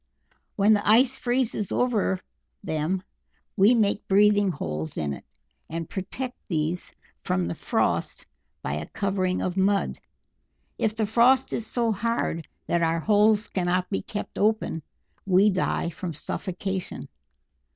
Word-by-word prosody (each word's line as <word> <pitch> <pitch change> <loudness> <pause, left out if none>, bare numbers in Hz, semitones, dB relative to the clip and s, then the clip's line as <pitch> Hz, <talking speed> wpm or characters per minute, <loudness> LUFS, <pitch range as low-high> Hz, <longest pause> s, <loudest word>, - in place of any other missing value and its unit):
When 205 +2 +5
the 205 0 +1
ice 250 +4 +5
freezes 240 -5 -1
over 215 -6 +1 0.4
them 180 +1 -1 0.5
we 215 +4 +5
make 210 -2 +1
breathing 205 0 +4
holes 80 - -4
in 75 -2 -1
it, - - -9 0.5
and 165 0 -4
protect 245 +7 -5
these 165 0 -1 0.3
from 90 -1 0
the 85 - -2
frost - - -1 0.4
by 70 - -2
a 75 +1 -4
covering 190 -2 -1
of 180 +1 -2
mud. 195 +1 +1 0.8
If 215 -1 +1
the 220 -1 0
frost 240 +5 +4
is 225 - -3
so 235 -2 +1
hard 215 -6 -1 0.2
that 170 - +1
our 165 0 +2
holes 210 +2 +4
cannot 180 0 0
be 195 - 0
kept 210 - -6
open, 215 -6 +1 0.5
we 195 +2 +5
die 180 -2 0
from 170 0 -5
suffocation." 190 +3 -4
195 Hz, 135 wpm, -26 LUFS, 175-220 Hz, 0.8 s, When